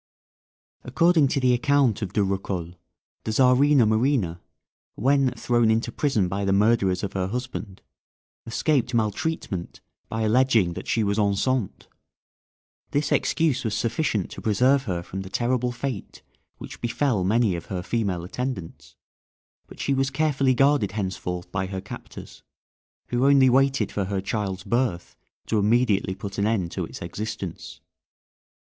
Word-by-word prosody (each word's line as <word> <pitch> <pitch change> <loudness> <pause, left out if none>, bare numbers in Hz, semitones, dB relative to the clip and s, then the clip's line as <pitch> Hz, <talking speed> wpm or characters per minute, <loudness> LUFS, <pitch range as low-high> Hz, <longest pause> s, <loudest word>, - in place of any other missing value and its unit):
According 160 +3 +3
to 140 - 0
the 130 -1 +3
account 130 -2 +2
of 100 -4 -3
De 105 - +2
Rocoles, 95 -3 -3 0.5
the 110 - -2
Czarina 130 +2 +4
Marina, 110 - +1 0.5
when 135 +2 +2
thrown 120 -2 +1
into 115 +2 +1
prison 115 -8 +1
by 100 +2 -3
the 100 - +1
murderers 100 -2 +2
of 100 - -3
her 95 -1 -1
husband, 115 - -6 0.6
escaped 125 0 0
maltreatment 110 - -2 0.3
by 110 0 -2
alleging 110 -5 +3
that - - -8
she 115 - +1
was 100 +1 0
enceinte. 105 +2 0 1.0
This 145 +1 -1
excuse 160 -6 +1
was 110 -3 -1
sufficient 115 - -1
to - - -8
preserve 130 +6 +2
her 90 -5 -3
from 95 +2 -6
the 95 - -8
terrible 125 +3 0
fate 125 -3 -6 0.3
which - - -10
befel 120 -3 0
many 105 0 +2
of 85 - -7
her 90 -2 -4
female 100 -6 -1
attendants, 100 -3 -6 0.7
but - - -14
she 140 - 0
was 135 0 +1
carefully 135 -2 +1
guarded 135 -7 +3
henceforth 95 -3 -4
by 95 -1 -2
her 95 0 -4
captors, - - -10 0.7
who 125 +3 +2
only 135 -2 +6
waited 135 +1 +2
for 100 - -2
her 100 0 -2
child's 95 -2 -3
birth 115 -4 -1 0.3
to 110 - 0
immediately 105 -3 +2
put 100 0 -6
an 100 - +2
end 95 -7 0
to - - -3
its - - -9
existence. 105 +6 -6
115 Hz, 145 wpm, -24 LUFS, 95-130 Hz, 1.0 s, only